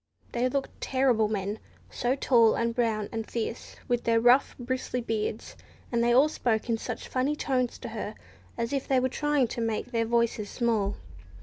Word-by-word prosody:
They 245 +1 +1
looked 275 +1 -3
terrible 255 -5 +2
men, 205 0 -3 0.3
so 245 +2 0
tall 235 -5 +4
and 230 0 0
brown 225 -3 0
and 225 -1 -4
fierce, 230 0 -4
with 245 -1 0
their 230 0 +3
rough 245 +4 +4
bristly 255 0 -3
beards; 220 -1 -3 0.4
and 235 -1 +2
they 240 - +3
all 265 +5 +6
spoke 240 -6 -1
in 225 - 0
such - - -5
funny 265 +3 0
tones 255 -4 -1
to - - -7
her, - - -5 0.4
as 235 +2 -2
if 275 -1 -1
they 265 -2 +3
were 260 +1 +1
trying 295 -1 +1
to 235 - -4
make 225 +2 -2
their 230 -2 +1
voices 230 -2 0
small. 220 -5 0
235 Hz, 185 wpm, -28 LUFS, 225-255 Hz, 0.4 s, all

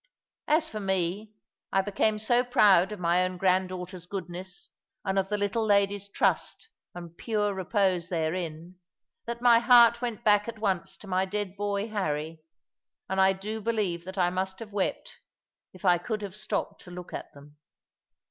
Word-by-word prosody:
As 315 +1 +3
for 215 - -3
me, 190 +1 -1 0.4
I 195 - +2
became 210 +2 +1
so 240 +3 +2
proud 210 -7 +4
of 210 - -6
my 175 +1 +2
own 185 0 -3
granddaughter's 185 -1 -1
goodness, 185 - -6 0.3
and 195 0 +1
of 190 0 -2
the 210 - 0
little 205 +3 0
lady's 200 -1 +2
trust 325 - 0 0.3
and 170 -1 -9
pure 210 0 -1
repose 190 -2 0
therein, 170 +1 -3 0.5
that 235 +1 -5
my 235 -2 +7
heart 235 -1 +6
went 235 -4 -4
back 210 0 +4
at 230 - -6
once 195 -5 -2
to 210 - -13
my 185 0 +1
dead 200 -1 -4
boy 205 +1 -2
Harry, 160 -6 -3 0.7
and 190 0 +2
I 190 0 +5
do 210 +3 -5
believe 205 -6 -1
that 190 +1 -8
I 175 -1 +2
must 190 +1 -2
have 210 -1 -10
wept, 200 -2 -3 0.5
if 185 +1 -12
I 175 -2 +5
could 215 +3 -4
have 195 -1 -6
stopped 210 0 -3
to - - -11
look 180 0 -9
at - - -6
them. 145 +1 -16
195 Hz, 170 wpm, -28 LUFS, 180-215 Hz, 0.7 s, my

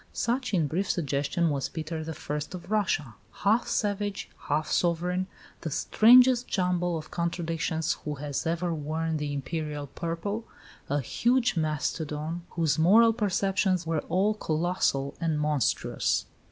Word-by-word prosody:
Such 250 +2 -1
in 175 -6 +2
brief 180 +7 -1
suggestion 150 +2 0
was 140 -2 -2
Peter 160 0 -5
I. 160 -1 -5 0.2
of 180 +2 -9
Russia, 170 - 0 0.2
half 220 +4 +2
savage, 205 -1 -1 0.2
half 155 +1 0
sovereign, 180 +2 +1 0.3
the 165 - -4
strangest 245 - +5
jumble 180 -2 0
of 155 -1 -9
contradictions 165 -2 -1
who 150 -1 -3
has 145 +1 -3
ever 170 +1 0
worn 160 +1 -2
the 150 -1 -3
Imperial 150 +1 -3
purple 170 - -4 0.4
"a 145 +1 +1
huge 240 - +1
mastodon, 155 +1 -2
whose 165 -3 0
moral 225 +8 +6
perceptions 195 -4 +1
were 160 -2 0
all 200 +4 +2
colossal 155 -6 0
and 160 -2 0
monstrous." 150 -2 0
165 Hz, 130 wpm, -28 LUFS, 155-195 Hz, 0.4 s, moral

